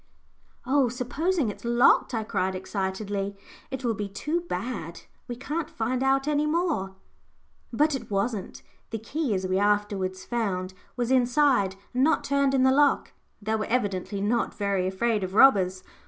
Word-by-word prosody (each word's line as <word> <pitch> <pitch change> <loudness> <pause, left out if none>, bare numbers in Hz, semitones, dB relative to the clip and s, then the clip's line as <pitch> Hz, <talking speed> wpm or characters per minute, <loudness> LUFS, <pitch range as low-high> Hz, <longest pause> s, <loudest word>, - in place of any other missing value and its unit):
"Oh! 265 -1 +3
supposing 265 - -1
it's 205 - -8
locked," 240 +1 +4
I 220 - -1
cried, 190 -3 -1
excitedly; 195 +1 -3 0.3
"it 265 -1 -5
will 230 - +2
be 205 -1 -4
too 300 - -2
bad. 185 -9 -4 0.3
We 240 - -4
can't 295 +6 -4
find 245 +3 -2
out 270 +1 +2
any 300 0 +1
more." 300 - -1 0.8
But 300 +6 +2
it 270 - -5
wasn't. 200 0 -2 0.3
The 225 - -3
key, 250 +1 -2
as 190 0 -2
we 185 +1 +1
afterwards 205 -2 0
found, 195 -6 -2 0.2
was 245 0 -1
inside, 250 -5 +3 0.2
and 255 +1 +2
not 320 +3 +3
turned 280 -1 +2
in 260 - +3
the 260 - +5
lock. 285 +1 +3 0.3
They 220 +1 -1
were 215 - -1
evidently 200 -4 -1
not 230 +4 0
very 200 -3 0
afraid 210 +2 0
of 185 +1 -4
robbers. 190 -7 +5
230 Hz, 160 wpm, -26 LUFS, 195-270 Hz, 0.8 s, the